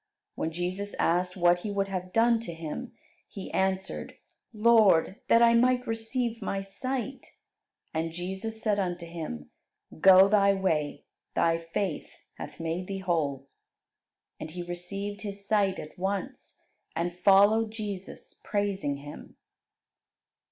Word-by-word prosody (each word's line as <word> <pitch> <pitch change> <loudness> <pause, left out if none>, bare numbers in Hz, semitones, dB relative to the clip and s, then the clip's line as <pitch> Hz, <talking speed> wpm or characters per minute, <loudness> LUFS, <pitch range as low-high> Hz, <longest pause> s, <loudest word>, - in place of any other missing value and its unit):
When 160 - -2
Jesus 185 +4 -3
asked 180 +2 +1
what 175 0 +4
he 210 - -5
would 200 -1 0
have 185 -1 -4
done 230 +2 +4
to 225 -7 -6
him, 165 +10 -6 0.4
he 195 - -8
answered, 190 0 -2 0.3
"Lord, 215 -5 +4
that 230 +1 +6
I 235 0 +6
might 250 +1 +3
receive 225 +1 -2
my 195 -1 -2
sight." 255 +6 -5 0.6
And 165 +1 -1
Jesus 190 +6 -5
said 210 -2 +2
unto 175 -2 -2
him, 155 - -7 0.5
"Go 190 +2 +8
thy 200 -1 +4
way; 160 -6 -1 0.3
thy 165 0 +2
faith 165 +1 -3 0.3
hath - - -8
made 165 +3 -3
thee 195 - -3
whole." 155 -8 -1 0.9
And 155 - -6
he 175 +2 -6
received 195 +4 -5
his 200 -2 -6
sight 200 -3 +2
at 155 +4 -9
once, 200 +8 -4 0.4
and 175 +1 -2
followed 205 +4 +5
Jesus, 210 -3 -7
praising 200 -8 -1
Him. 145 +1 -11
195 Hz, 130 wpm, -28 LUFS, 175-215 Hz, 0.9 s, Go